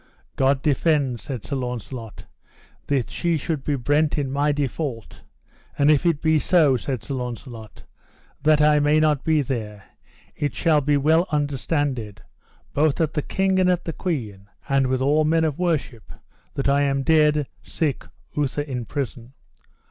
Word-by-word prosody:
God 135 0 +2
defend, 145 -4 +1
said 125 -4 -7
Sir 140 - -3
Launcelot, 125 -2 -6 0.6
that 135 -5 0
she 170 -2 0
should 150 -1 -3
be 145 - 0
brent 145 +4 +1
in 140 -3 -2
my 145 +2 +1
default; 140 -4 -4 0.6
and 145 +1 +4
if 155 +3 +2
it 160 -4 0
be 160 -1 +3
so, 155 -5 +4
said 125 -2 -4
Sir 135 - -5
Launcelot, 120 -3 -7 0.6
that 150 0 +4
I 150 0 +5
may 150 +1 +3
not 150 -3 +2
be 155 -2 +2
there, 105 -6 -5 0.5
it 145 -7 -2
shall 155 +5 +3
be 145 +1 +2
well 160 +5 +3
understanded, 145 - -2 0.5
both 150 0 +2
at 160 -2 0
the 150 - 0
king 190 +4 0
and 185 0 +3
at 180 -1 0
the 165 - -3
queen, 110 - -4 0.2
and 135 -1 +2
with 130 0 0
all 150 +3 +3
men 160 +1 +2
of 155 -2 -1
worship, 155 - -2 0.4
that 140 - -1
I 140 +1 +3
am 140 -1 +1
dead, 150 -1 +3 0.2
sick, 150 -5 -2 0.3
outher 145 0 -1
in 125 -5 -5
prison. 125 -1 -5
145 Hz, 165 wpm, -23 LUFS, 130-155 Hz, 0.6 s, I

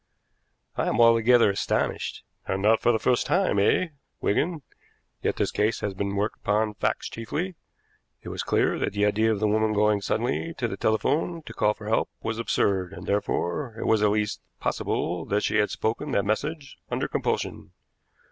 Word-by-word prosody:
"I - - 0
am - - 0
altogether 115 -1 +6
astonished." 100 - -1 0.2
"And 95 - -1
not 110 +1 +4
for 120 - +4
the 115 - +2
first 120 +2 +1
time, 185 - +2
eh, 165 - +3 0.3
Wigan? 155 - 0 0.6
Yet - - 0
this - - 0
case 105 +2 0
has 100 - -2
been 100 +1 -3
worked 105 +2 -1
upon 105 +1 0
facts 105 - -1
chiefly. 155 +11 -4 0.7
It - - -7
was - - -3
clear - - +1
that - - -1
the 105 0 +2
idea 110 +2 +2
of 105 - -1
the 110 - +2
woman 110 +1 +2
going 105 -1 +3
suddenly 125 +11 -1
to 120 - -1
the 95 - -4
telephone 145 - 0
to - - -9
call 105 0 +2
for 105 - -10
help 110 - +1
was 110 0 -2
absurd, 95 -5 0
and, - - -9
therefore, 105 +4 -1
it - - -4
was 110 -1 +3
at 105 - +4
least 105 0 -1 0.2
possible 85 -1 -1
that 105 +1 0
she - - +1
had 105 0 +3
spoken 115 +7 -2
that 100 - +2
message 140 +8 -3
under - - -1
compulsion. - - -2
110 Hz, 185 wpm, -26 LUFS, 105-120 Hz, 0.7 s, altogether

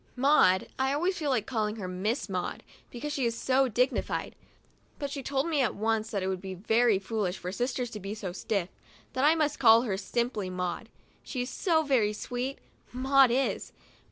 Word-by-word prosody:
Maud 250 -8 +4
— - - -28
I 265 0 +2
a - - +1
Ways 365 +3 0
feel 300 -3 -1
like 240 -6 +1
calling 215 -4 -1
her 200 -5 -5
Miss 195 +7 -2
Maud, 185 -3 -3 0.3
because 290 +5 -5
she 275 - -1
is 230 0 -3
so 265 +2 +2
dignified; 250 +3 0 0.6
but 285 -2 -4
she 280 - -4
told 275 +3 -1
me 310 -4 +1
at 245 - 0
once 220 +1 0
that 200 -4 -2
it - - -1
would 190 -1 -2
be 190 -1 -6
very 220 +3 +3
foolish 195 -2 -2
for 180 - -5
sisters 245 +2 -2
to 210 - -6
be 200 +2 -5
so 200 -4 -5
stiff 190 0 -2 0.2
— - - -28
that 260 - 0
I 310 +2 +6
must 300 -2 0
call 225 +1 +7
her 200 -6 -1
simply 215 -1 -2
Maud. 180 +4 -4 0.3
She 255 -3 -4
is 250 - -6
so 325 -4 +2
very 240 -8 +2
sweet, 245 +5 -4 0.3
Maud 265 +1 +4
is! 260 +3 -1
235 Hz, 210 wpm, -29 LUFS, 200-270 Hz, 0.6 s, call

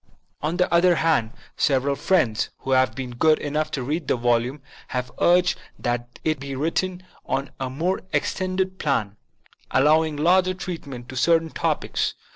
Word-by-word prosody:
On 155 +4 -1
the 180 - +3
other 175 +1 +5
hand, 160 -9 +2 0.3
several 140 0 +2
friends, 135 - +1
who 135 - -4
have 130 -3 +3
been 130 -1 -5
good 155 +6 +3
enough 150 +1 -2
to 130 - -3
read 150 +4 -2
the - - +2
volume, 120 +3 0 0.2
have 125 0 -3
urged 180 +1 +4 0.2
that 120 0 -3
it 155 -3 0
be 135 0 -5
rewritten 180 +5 -1 0.2
on 140 +1 -2
a 130 -1 -2
more 170 +8 -1
extended 185 0 -1
plan, 105 -9 0 0.5
allowing 155 +3 +3
larger 185 +4 +3
treatment 145 -10 -7
to 130 - -7
cer 165 +7 +4
tain 160 -1 -7
topics. - - -1
150 Hz, 160 wpm, -24 LUFS, 130-170 Hz, 0.5 s, other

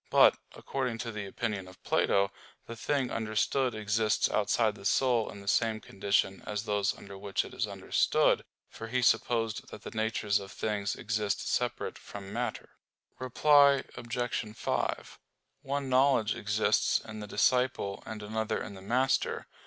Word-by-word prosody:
But, - - +7 0.2
according 125 -4 -3
to 115 +1 -4
the 105 -2 -5
opinion 100 -2 -3
of 95 0 -16
Plato, 100 0 +2 0.3
the 115 - -7
thing 130 +2 -1
understood 115 +3 0
exists 110 0 +1
outside 105 +1 +2
the 105 - -13
soul 120 +1 +2
in 100 - -9
the 100 - -14
same 110 +1 +2
condition 95 -1 0
as 105 0 -2
those 105 -2 0
under 100 -1 -10
which 100 0 -1
it - - -11
is - - -1
understood; - - +2 0.2
for 115 - -8
he 125 +2 0
supposed 115 -1 +1
that 105 - -10
the - - -7
natures 110 -2 0
of 100 -1 -9
things 105 -2 -2
exist 105 -1 -2
separate - - -1
from 100 0 -9
matter. 120 +2 -3 0.5
Reply 140 +2 +5
Obj. 120 -2 -3
5: - - -2 0.4
One 140 0 -2
knowledge 130 -4 +3
exists 105 +2 +2
in 110 -1 -9
the 105 - -6
disciple 125 -4 +1
and 110 -1 -7
another 110 +1 -2
in - - -6
the 95 - -11
master. 130 +6 +1
110 Hz, 155 wpm, -30 LUFS, 105-120 Hz, 0.5 s, But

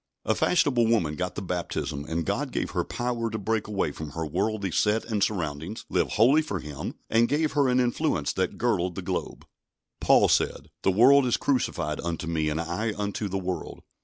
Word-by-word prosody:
A - - +3
fashionable 125 -9 +2
woman 90 -10 +1
got 90 +3 -3
the 100 - -4
baptism, 85 -5 -3
and 80 +1 -2
God - - -1
gave - - -2
her - - 0
power 120 -1 -2
to 110 - -3
break 110 +1 -1
away 100 -7 -1
from 75 -1 -8
her 80 0 -3
worldly 100 +4 -1
set 105 +6 +1
and 110 -3 0
surroundings, 85 0 -3
live - - 0
wholly 130 +8 +5
for 150 -11 -3
Him, 75 -3 -6
and 115 +1 +3
gave 155 +1 +1
her 140 -2 +2
an 125 0 +3
influence 120 - 0
that - - -1
girdled 90 0 0
the - - -5
globe. - - -4 0.5
Paul - - +5
said: - - 0
"The - - +2
world 130 +7 +6
is 120 - +2
crucified 135 -3 -1
unto 85 -1 -3
me, 80 -2 0
and 75 +1 -2
I 85 +7 -2
unto 105 0 -2
the 95 - -2
world." 90 -3 -5
100 Hz, 195 wpm, -26 LUFS, 85-115 Hz, 0.5 s, world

